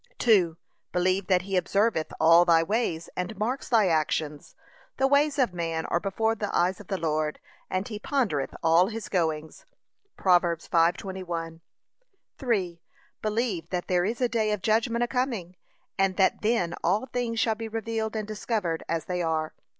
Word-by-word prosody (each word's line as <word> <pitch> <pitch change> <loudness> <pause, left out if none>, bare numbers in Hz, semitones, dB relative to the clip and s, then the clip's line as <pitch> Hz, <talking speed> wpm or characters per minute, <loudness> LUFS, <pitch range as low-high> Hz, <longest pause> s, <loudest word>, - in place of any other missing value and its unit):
2. 185 -8 +3 0.3
Believe 185 +1 +1
that 180 -2 +3
he 195 0 -3
observeth 185 -1 +1
all 165 +2 +7
thy 165 -2 +4
ways 170 -4 -1
and 185 +4 -4
marks 240 +6 -2
thy 225 -6 +4
actions. 155 -2 -1 0.4
'The 265 - +2
ways 285 +1 +3
of 250 -9 +2
man 165 -2 -2
are 170 - 0
before 220 +4 0
the 210 -2 -3
eyes 180 +2 +1
of 205 - -12
the 190 - -2
Lord, 155 -2 -1 0.3
and 185 +2 -2
he 215 -3 -6
pondereth 210 - -1
all 165 +3 +5
his 220 -3 -6
goings.' 160 -4 -2 0.5
(Prov. 180 -2 +5
5:21) 170 0 -1 0.8
3. 190 - -1 0.4
Believe 215 -6 -1
that 180 -1 -2
there 180 -1 +2
is 225 +4 -2
a 250 - +4
day 225 -2 0
of 210 -3 -2
judgment 230 +2 +2
a - - 0
coming, 235 -9 -2 0.4
and 195 -1 +2
that 190 - +2
then 210 -6 +1
all 195 +8 +1
things 240 -3 -2
shall 225 0 +2
be 225 +1 -6
revealed 225 0 -3
and 215 -1 -3
discovered 210 -6 -2
as 165 -1 -1
they 180 -1 -2
are. 160 -1 -1
190 Hz, 165 wpm, -27 LUFS, 170-225 Hz, 0.8 s, all